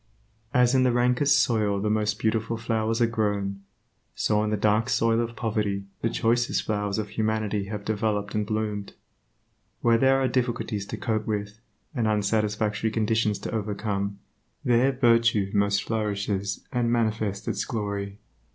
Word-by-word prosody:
As 125 0 +4
in 130 - +4
the 130 -1 +4
rankest 125 +4 +3
soil 105 -4 +1
the 105 - -1
most 105 0 0
beautiful 110 +1 0
flowers 115 0 -1
are - - +6
grown, 105 -3 -1 0.5
so 105 0 +1
in 110 - -1
the 105 - 0
dark 105 +2 +2
soil 115 0 +2
of 115 0 -4
poverty 105 -4 -1 0.2
the 115 - +1
choicest 120 +2 +1
flowers 105 -1 -1
of 105 -1 -3
humanity 110 -1 -1
have 105 0 -6
developed 105 -1 -1
and 105 - 0
bloomed. 105 -1 -3 0.9
Where 115 -1 +4
there 135 +1 +4
are 135 - +2
difficulties 120 -5 -1
to - - -5
cope 110 -2 -2
with, 105 0 -3 0.3
and 120 -6 0
unsatisfactory 105 0 0
conditions 110 -1 +1
to - - -4
overcome, 100 -2 -2 0.5
there 125 +2 +4
virtue 115 -6 +3
most 100 0 +2
flourishes 100 -2 -2
and 120 -2 +1
manifests 110 -3 -1
its - - -1
glory. 100 -4 -4
110 Hz, 150 wpm, -26 LUFS, 105-115 Hz, 0.9 s, are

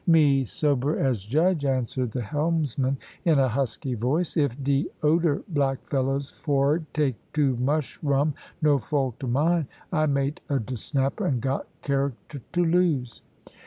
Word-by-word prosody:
"Me 145 -5 +5
sober 145 +3 0
as 130 -7 +1
judge," 155 - +2
answered 130 -2 0
the 120 +2 -3
helmsman, 145 0 0 0.3
in 165 -5 +4
a 135 -1 +4
husky 130 +1 -2
voice. 135 +9 0
"If 140 -4 +1
de 140 0 +1 0.2
oder 155 -1 +2
black 140 -5 0
fellers 135 0 0
for'ard 145 +2 0
take 150 -4 +1 0.2
too 140 -4 +2
mush 140 +4 -1
rum, 145 0 +2 0.3
no 145 -2 +4
fault 135 0 -2
o' - - -2
mine. 155 +5 +2 0.3
I 155 -2 +2
mate 140 +1 0
of 135 -6 0
de 130 - -4
Snapper, 135 +3 -1
and 130 -4 +1
got 135 +3 -2 0.2
character 140 0 -2
to 175 -1 +2
lose." 165 -8 +1
140 Hz, 155 wpm, -26 LUFS, 130-150 Hz, 0.3 s, Me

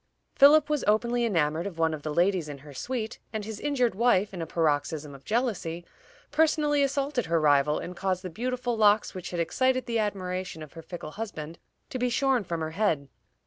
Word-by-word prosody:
Philip 290 +2 +7
was 300 -3 0
openly 235 +3 +2
enamored 165 -4 +1
of 180 -5 -8
one 160 -1 +2
of 155 - -5
the 155 - -4
ladies 175 0 +1
in 145 - -6
her 145 - -11
suite, 225 - -4
and 215 -2 -4
his 220 -1 -6
injured 255 -6 +1
wife, 205 -2 +2
in 180 - -5
a 165 - -4
paroxysm 150 -2 -1
of 135 0 -13
jealousy, 210 -8 -2 0.5
personally 300 -1 +3
assaulted 275 - 0
her 165 0 +2
rival, 150 0 +3
and 180 - -6
caused 185 0 -1
the 185 - -5
beautiful 245 +4 -2
locks 210 -1 +3
which 185 -2 -6
had 175 - -4
excited 255 +9 +1
the 230 -2 -1
admiration 185 -5 -3
of 155 - -12
her 165 - -9
fickle 165 -2 -8
husband 165 -6 -6 0.3
to 255 - -3
be 250 0 +1
shorn 260 -1 +2
from 170 -3 -4
her 160 0 -3
head. 160 -7 0
195 Hz, 200 wpm, -27 LUFS, 165-245 Hz, 0.5 s, Philip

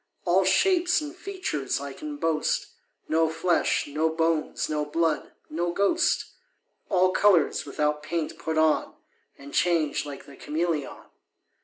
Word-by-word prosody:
All - - +4
shapes 360 -2 +3
and 300 +1 -7
features 365 - -3
I 140 0 -6
can 300 - -7
boast, 160 - 0 0.4
No 160 0 +2
flesh, 165 +2 +1
no 155 +3 0
bones, 160 -1 0
no 150 -1 -1
blood 160 +1 -1 0.2
no 170 +2 -2
ghost: 265 - +2 0.6
All 185 -2 +3
colours, 185 -7 +3
without 150 +1 -1
paint, 165 0 -3
put 160 -1 -2
on, 155 -1 +2 0.4
And 140 0 -12
change 165 -4 +2
like 140 -2 -8
the 140 - -13
cameleon. 155 0 -2
165 Hz, 135 wpm, -26 LUFS, 150-185 Hz, 0.6 s, All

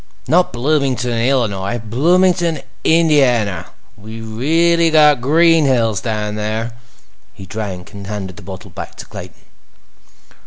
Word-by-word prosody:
Not 175 +6 +3
Bloomington, 130 -1 0
Illinois—Bloomington, 125 - +1 0.2
Indiana. 125 - +2 0.3
We 110 +2 -10
really 165 +10 +1
got 150 -4 +5
green 165 +3 +4
hills 115 -7 +1
down 105 -2 -3
there." 110 +2 -3 0.6
He 100 -2 -10
drank, 95 -2 -6
and 100 -1 -9
handed 95 -3 -5
the - - -10
bottle 95 0 -10
back - - -8
to - - -10
Clayton. - - -11
120 Hz, 115 wpm, -17 LUFS, 105-155 Hz, 0.6 s, got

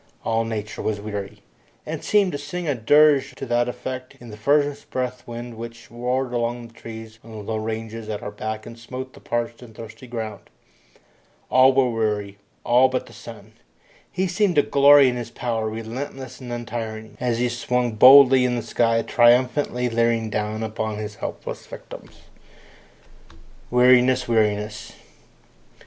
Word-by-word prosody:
All 115 0 +1
nature 110 -1 -5
was 105 -1 -2
weary, 100 -1 -6 0.4
and - - -5
seemed 205 -3 +3
to 145 - -4
sing 165 +4 -5
a 145 - +2
dirge 145 +4 +4
to - - -6
that 120 0 +1
effect 130 +1 -6
in 120 -2 -11
the - - -8
furnace 145 +5 +1
breath 125 -1 -4
wind 120 0 -7
which 115 0 -9
roared 125 +2 -2
among 120 0 -2
the - - -23
trees 110 -1 -10
on 115 - -14
the 110 - -9
low 110 +2 -3
ranges 110 0 -5
at 105 -1 -4
our 105 - -5
back 110 +1 -5
and 115 - -11
smote 130 +2 -7
the - - -14
parched 120 0 -3
and 115 -3 -13
thirsty 115 +3 -11
ground. 110 -4 -6 1.0
All 130 +1 +6
were 130 -2 +3
weary, 105 -3 -2 0.2
all 125 +2 +4
but 130 0 -2
the - - -15
sun. 110 -2 -12 0.6
He 185 +1 -1
seemed 185 0 +1
to 145 - +5
glory 140 0 +6
in 125 -1 0
his 120 -2 -5
power, 115 -3 -2
relentless 130 +4 -7
and 125 -1 -8
untiring, 115 -2 -6
as 120 -2 0
he 125 +1 +1
swung 120 0 -1
boldly 130 +3 +8
in 125 -1 +1
the 120 - -3
sky, 115 0 +1
triumphantly 125 +1 +3
leering 115 -1 0
down 105 +1 -2
upon 110 -1 -3
his 105 0 -5
helpless - - -6
victims. - - -12 1.5
Weariness! 125 +1 +4
Weariness! 105 -1 0
120 Hz, 160 wpm, -23 LUFS, 110-130 Hz, 1.5 s, boldly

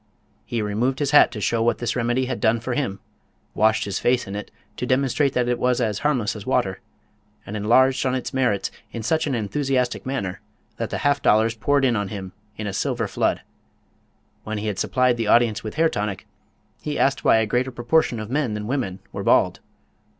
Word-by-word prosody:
He 115 -2 -2
removed 115 +6 0
his 145 -1 -1
hat 150 - +7
to 110 - -6
show 115 +4 0
what 120 +1 +2
this 120 -1 -2
remedy 125 +1 0
had 130 - -4
done 115 0 +3
for 120 +2 -3
him, 120 -8 -2 0.5
washed 110 0 +2
his 100 - -2
face 125 0 +1
in 100 - -6
it 105 - -6 0.3
to 125 - -3
demonstrate 135 +2 +1
that 125 -1 +1
it 125 -1 0
was 125 0 +1
as 110 -4 0
harmless 130 -8 0
as - - -7
water, - - 0 0.7
and 100 - -6
enlarged 130 +5 +3
on 130 -1 0
its 130 - -4
merits 125 -7 0 0.2
in 115 - -5
such 155 +7 +1
an 135 - 0
enthusiastic 125 +3 -1
manner 100 -9 -4 0.4
that - - -3
the - - -3
half 145 0 +3
dollars 110 +1 +3
poured 140 +5 +1
in 120 -3 +2
on 100 -2 -1
him 95 -2 -6 0.3
in 110 - -4
a 100 - -3
silver 120 -1 -1
flood. - - 0 1.0
When 110 0 -4
he 105 - -4
had 105 -3 -2
supplied 125 -2 +2
the 115 -2 -2
audience 115 -1 +3
with 110 - -6
hair 165 +2 +4
tonic, 105 - -3 0.6
he 150 - -3
asked 140 0 +1
why - - +5
a 110 - +2
greater 125 +4 0
proportion 120 0 +1
of 110 +1 -6
men 135 -6 0
than 105 0 -4
women 110 -7 -3
were - - -5
bald. - - +3
120 Hz, 210 wpm, -23 LUFS, 105-130 Hz, 1.0 s, hat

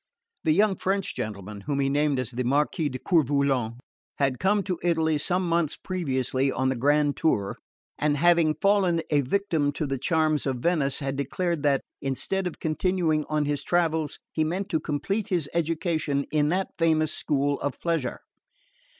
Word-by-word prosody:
The 155 - +3
young 195 +4 +3
French 195 0 -1
gentleman 105 -3 -5
(whom 140 +6 -2
he 135 - +2
named 145 0 +1
as 130 -1 -2
the 125 +1 -2
Marquis 145 +4 +1
de 130 - -5
Coeur 170 +4 +3
Volant) 135 -4 0 0.4
had 135 -3 +1
come 200 +1 +2
to 185 -3 -3
Italy 160 -3 +1
some 180 +4 0
months 170 -2 +1
previously 135 -6 -1
on 130 0 0
the 130 - 0
grand 145 +3 +2
tour, 100 -11 0 0.4
and 150 -1 +1
having 165 -1 +4
fallen 185 -1 +2
a 145 -1 +4
victim 155 0 0
to 150 - -2
the 135 -2 -2
charms 155 0 +1
of 135 - 0
Venice, 140 -1 +1
had 135 0 -2
declared 160 +4 -1
that, 140 -2 +2 0.2
instead 180 +8 -1
of 175 - -7
continuing 160 -1 0
on 155 -1 +1
his 145 0 -1
travels, 160 -4 0
he 155 - 0
meant 180 +5 -2
to 160 - +1
complete 195 +10 -2
his 175 -8 0
education 160 -3 0
in 150 -1 +2
that 185 +3 0
famous 155 -2 +2
school 145 -1 0
of 140 -2 -3
pleasure. 165 -8 -2
155 Hz, 175 wpm, -26 LUFS, 140-170 Hz, 0.4 s, having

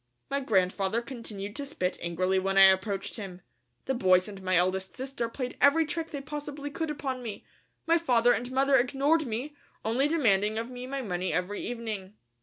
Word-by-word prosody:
My 280 - +1
grandfather 195 -3 +1
continued 215 -5 -6
to 285 - -2
spit 185 -11 -2
angrily 185 +3 0
when 195 +1 -1
I 195 - +9
approached 195 +2 -2
him. 190 -4 -7 0.4
The 265 - 0
boys 185 -5 +4
and 200 -2 -9
my 185 0 +1
eldest 185 +2 0
sister 260 -3 -3
played 250 +1 -5
every 315 +3 +6
trick 325 +1 -4
they 285 - -5
possibly 290 0 -6
could 320 +2 -3
upon 270 -3 -3
me. 225 -4 -7 0.4
My 335 +1 +4
father 245 -6 +4
and 245 +2 -3
mother 270 +1 +4
ignored 280 +5 +2
me, 250 +7 -4 0.3
only 245 +6 +2
demanding 220 -9 +2
of 230 +2 -3
me 250 0 -7
my 275 0 -3
money 180 -3 -2
every 180 +5 -2
evening. 215 -5 -5
235 Hz, 185 wpm, -29 LUFS, 195-275 Hz, 0.4 s, I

